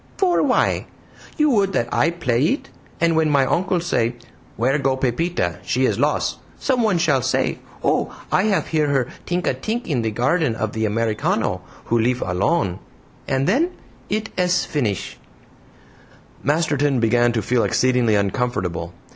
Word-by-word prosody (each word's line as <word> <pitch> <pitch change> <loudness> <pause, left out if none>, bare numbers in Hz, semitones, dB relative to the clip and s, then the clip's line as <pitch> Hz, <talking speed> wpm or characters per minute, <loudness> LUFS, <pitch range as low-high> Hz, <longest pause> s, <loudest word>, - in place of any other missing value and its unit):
"For 365 -3 +3
why? - - +1 0.5
You 300 -2 +3
would 200 -5 +2
that 120 - +1
I 160 - +3
PLAY 130 -9 -1
it, 275 - -1 0.3
and 165 -1 +2
when 160 -1 +3
my 140 -2 +3
uncle 180 +5 +1
say 120 -9 0 0.4
'Where 130 +6 +1
go 135 -1 +1
Pepita? 130 - -1
She 125 +8 0
is - - 0
loss,' - - 0 0.2
someone 230 -8 +1
shall 155 -6 +2
say, 130 - 0 0.2
'Oh! - - +1 0.2
I 190 - +3
have 205 -3 +1
hear 155 -2 +1
her 135 -4 +1 0.2
tink 180 +1 -1
a - - +2
tink 230 +3 -3
in 135 -7 0
the 110 - 0
garden 125 +4 +1
of 110 -1 -3
the 110 0 -1
Americano, 110 0 0 0.2
who 120 - +1
lif 125 +2 +1
alone.' 95 - 0 0.5
And 135 0 +1
then 305 - +2 0.4
it 215 +1 -2
ess 180 0 +2
finish!" 115 - -2 1.2
Masterton 145 -2 +1
began 120 +1 +3
to 110 -3 -1
feel 120 +2 +1
exceedingly 125 -4 +2
uncomfortable. 100 -6 -1
135 Hz, 155 wpm, -21 LUFS, 115-175 Hz, 1.2 s, For